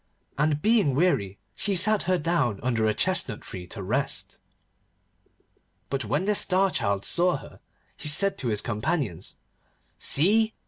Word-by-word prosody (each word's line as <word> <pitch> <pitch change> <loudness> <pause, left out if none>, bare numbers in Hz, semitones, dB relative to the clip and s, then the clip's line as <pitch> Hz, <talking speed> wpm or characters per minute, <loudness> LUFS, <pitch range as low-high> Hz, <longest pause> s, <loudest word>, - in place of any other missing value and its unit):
And 150 0 0
being 210 - +3
weary 130 - +1 0.2
she 200 -1 0
sat 205 +3 +3
her 185 - +3
down 150 - 0
under 115 -3 +1
a 110 - +2
chestnut 180 - -1
tree 90 -1 -8
to 100 +1 -6
rest. 130 +9 -1 1.5
But 135 -4 -2
when 145 - -1
the 210 - +2
Star 195 -1 +2
Child 100 - -1
saw 175 -3 +1
her, 135 - -13 0.4
he - - -3
said 195 +7 +3
to 130 - -3
his 105 -3 +1
companions, 105 - -2 0.6
'See! 220 +9 +3
145 Hz, 145 wpm, -26 LUFS, 110-185 Hz, 1.5 s, being